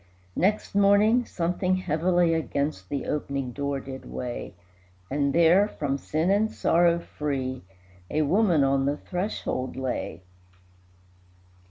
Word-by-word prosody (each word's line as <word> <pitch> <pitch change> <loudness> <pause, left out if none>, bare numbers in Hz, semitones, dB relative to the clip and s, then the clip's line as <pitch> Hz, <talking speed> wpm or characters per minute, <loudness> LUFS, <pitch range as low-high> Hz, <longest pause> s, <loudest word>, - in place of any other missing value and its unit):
Next 210 +4 0
morning 205 +4 +4
something 180 +2 0
heavily 175 0 +1
Against 145 - -2
the 140 - -3
opening 140 -3 -3
door 140 +1 -2
did 135 0 -8
weigh, 120 -5 -6 0.6
And 140 0 +1
there, 170 +5 +5
from 140 -8 -3
sin 160 +7 0
and 215 +2 +2
sorrow 170 0 +3
free, 135 -6 -4 0.5
A 155 - +1
woman 175 -2 +3
on 135 0 +2
the 145 +1 0
threshold 180 -9 -3
lay. 125 -10 -4
155 Hz, 120 wpm, -26 LUFS, 140-185 Hz, 0.6 s, there